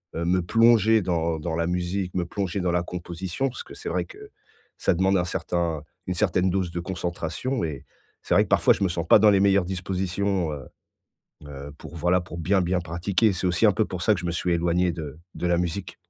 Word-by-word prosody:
heu, 85 - -2
me 90 +2 +2
plonger 110 +2 +4
dans 85 -3 0
dans 80 +1 -3
la 85 0 0
musique, 90 +1 -2
me 90 -1 0
plonger 95 +1 -3
dans 90 -1 0
la 85 0 +1
composition. 90 +8 -4
Parce 125 - -8
que - - -13
c'est - - -6
vrai 90 0 -1
que - - -13 0.5
ça - - +2
demande 95 +2 +2
un 90 - +1
certain 85 -3 -2 0.2
une 90 - -2
certaine 90 -1 +2
dose 90 -1 -1
de 85 - -3
concentration 90 +7 -3
et 75 -4 -6 0.4
c'est - - -1
vrai - - +5
que - - -16
parfois - - +5
je - - -7
me - - +3
sens 85 -1 -2
pas - - +7
dans 105 +1 +6
les 100 - +4
meilleures 100 -2 +4
dispositions, 95 -1 -1
heu 70 -2 -7 0.8
heu, 70 0 -8
pour 85 - -10
voilà 90 +3 +2
pour 85 -1 -9
bien, 95 +4 +2
bien 90 +1 +1
pratiquer, 90 +6 +1
c'est 90 0 -2
aussi 90 +5 +3
un 105 - +5
peu 110 - +1
pour 90 -3 -6
ça 105 - +4
que 90 - -4
je 90 - -5
me - - 0
suis 85 +1 -1
éloigné 85 +1 +1
de 75 -3 -7 0.2
de - - -2
la 85 0 +3
musique. 90 +2 -3
90 Hz, 230 wpm, -25 LUFS, 85-95 Hz, 0.8 s, pas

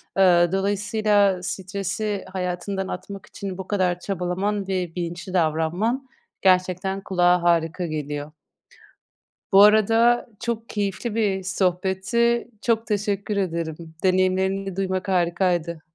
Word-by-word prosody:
Aaa, 175 -3 +5
dolayısıyla 205 0 +1
stresi 195 +2 -3
hayatından 190 +1 -3
atmak 195 +2 -7
için 195 -2 -7
bu 190 -1 -7
kadar 180 -3 0
çabalaman 195 +2 -2
ve 180 -3 -2
bilinçli 175 +1 -5
davranman 175 - 0 0.3
gerçekten 185 +1 +2
kulağa 180 -2 +2
harika 170 +1 +1
geliyor. 150 -1 -4 1.2
Bu 195 +1 +7
arada 225 +3 +4
çok 230 -1 -4
keyifli 205 +2 -3
bir 200 -4 0
sohbetti, 190 +6 0
çok 225 -1 0
teşekkür 205 -1 -1
ederim. 165 -3 -3
Deneyimlerini 190 +1 +1
duymak 190 0 -2
harikaydı. 175 -2 0
190 Hz, 105 wpm, -23 LUFS, 180-205 Hz, 1.2 s, Bu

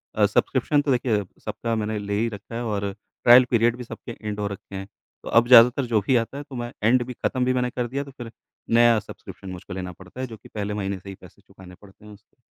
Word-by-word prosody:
अ, - - +4
subscription 145 -1 +2
तो 145 -1 0
देखिए 120 -5 +1 0.2
सबका 115 -1 -2
मैंने 110 0 -2
ले 100 0 -4
ही 115 +1 +1
रखा 105 +1 -9
है 120 - -3
और 100 -3 -2 0.3
ट्रायल 125 +1 +8
पीरियड 120 0 +3
भी 125 - -6
सबके 120 - -9 0.2
एंड 105 0 -3
हो 105 - -1
रखे 100 0 -8
हैं। 95 0 -6 0.4
तो - - -7
अब 120 +1 +5
ज़्यादातर 125 +2 +7
जो 115 -3 +2
भी 130 +6 +1
आता 115 +3 0
है 145 - -5
तो 135 - -8
मैं 120 -1 -4
एंड 120 +3 +4
भी 125 - -6
खत्म 125 +1 -1
भी 130 - +2
मैंने 125 -1 0
कर 125 0 -3
दिया, 135 +4 -3
तो 140 - -12
फिर 120 -2 -8 0.4
नया 120 -1 +6
सब्सक्रिप्शन 95 -1 -11
मुझको 90 0 -8
लेना 90 -1 -5
पड़ता 90 +6 -14
है 130 - -3
जो 115 -2 -10
कि - - -17
पहले 105 0 -2
महीने 100 -2 -3
से 100 - -11
ही 95 - -7
पैसे - - -16
चुकाने 90 -1 -15
पड़ते 105 +1 -17
हैं 105 - -12
उसके। 105 +2 -21
115 Hz, 260 wpm, -24 LUFS, 100-125 Hz, 0.4 s, ट्रायल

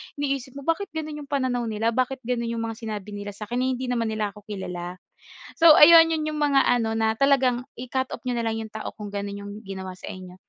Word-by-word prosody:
iniisip 275 -2 -3
mo, 280 - -8
bakit 330 +5 0
gano'n 310 -1 -4
'yong 285 - -9
pananaw 255 -4 0
nila, 220 +1 0
bakit 255 +1 -1
gano'n 235 -1 -1
'yong 230 0 -2
mga 225 +1 -5
sinabi 210 -3 -6
nila 205 0 -6
sa'kin, 225 +4 -4
eh, 260 - +1
hindi 260 - -4
naman 230 -2 0
nila 215 -2 -2
ako 210 - -14
kilala. 180 -3 -5 0.7
So 325 -2 +9
ayun, 330 +1 +9
'yon 315 -1 0
'yong 300 - -4
mga 280 -2 +4
ano 235 -2 +2
na 220 0 +2
talagang 255 -1 +3
i-cut 255 +1 -2
off - - -7
niyo 250 -1 -1
na 225 - 0
lang 225 - -2
'yong 220 - -11
tao 220 - -5
kung 205 -1 -8
gano'n 200 0 -4
'yong 205 - -7
ginawa 190 -2 -6
sa 185 - -9
inyo. 185 -1 -9
235 Hz, 235 wpm, -25 LUFS, 210-270 Hz, 0.7 s, So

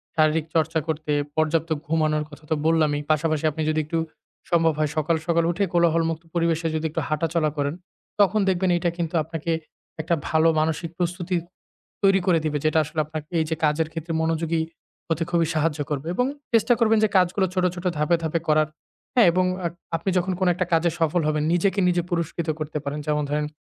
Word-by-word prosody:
শারীরিক 155 0 +3
চর্চা 160 0 +2
করতে 155 -1 -2 0.2
পর্যাপ্ত 160 +1 +1 0.2
ঘুমানোর 155 -1 +1
কথা 150 +1 -14
তো - - +4
বললামই 155 -3 +2
পাশাপাশি 155 0 +1
আপনি 155 +2 -5
যদি 155 0 +1
একটু 165 +2 -2 0.5
সম্ভব 165 -2 +4
হয় 155 -1 +1
সকাল, 155 +2 +2
সকাল 170 -1 +3
উঠে 185 +4 -1
কোলাহলমুক্ত 165 -1 +2
পরিবেশে 165 -1 +1
যদি 155 0 -2
একটু 165 - -2
হাঁটাচলা 155 0 0
করেন 145 +1 0 0.5
তখন 205 +1 +4
দেখবেন 185 0 +1
এটা 175 0 0
কিন্তু 170 -1 -3
আপনাকে 165 0 -4 0.5
একটা 165 +2 +1
ভালো 160 0 +4
মানসিক 160 +1 -1
প্রস্তুতি 180 0 -2 0.7
তৈরি 195 -1 +5
করে 175 -3 +4
দিবে 150 -1 0
যেটা 155 +1 +3
আসলে 150 +2 -10
আপনাকে 155 0 -7
এই - - +2
যে - - +1
কাজের 155 +1 +2
ক্ষেত্রে 165 +1 -5
মনোযোগী 165 0 0 0.5
হতে 165 0 0
খুবই 170 -2 +2
সাহায্য 155 0 0
করবে। 145 0 -3
এবং 250 +6 +2 0.3
চেষ্টা 230 +1 +4
করবেন 225 -1 +4
যে - - +3
কাজগুলো 185 +1 +3
ছোট, 185 -1 +1
ছোট 175 - -8
ধাপে, 150 +3 +2
ধাপে 160 +1 0
করার, 155 0 +3 0.5
হ্যাঁ? 235 -5 +6
এবং 185 +2 +2 0.2
আ - - +2 0.3
আপনি 165 +4 -5
যখন 180 +1 -1
কোন 185 - +2
একটা 185 +1 -1
কাজে 165 +1 +3
সফল 165 +2 +2
হবেন 155 -1 0
নিজেকে 190 +3 +2
নিজে 175 -1 +2
পুরস্কৃত 170 -1 -2
করতে 155 0 -3
পারেন 145 +1 -3
যেমন 150 0 +1
ধরেন 150 0 0
165 Hz, 190 wpm, -24 LUFS, 155-175 Hz, 0.7 s, হ্যাঁ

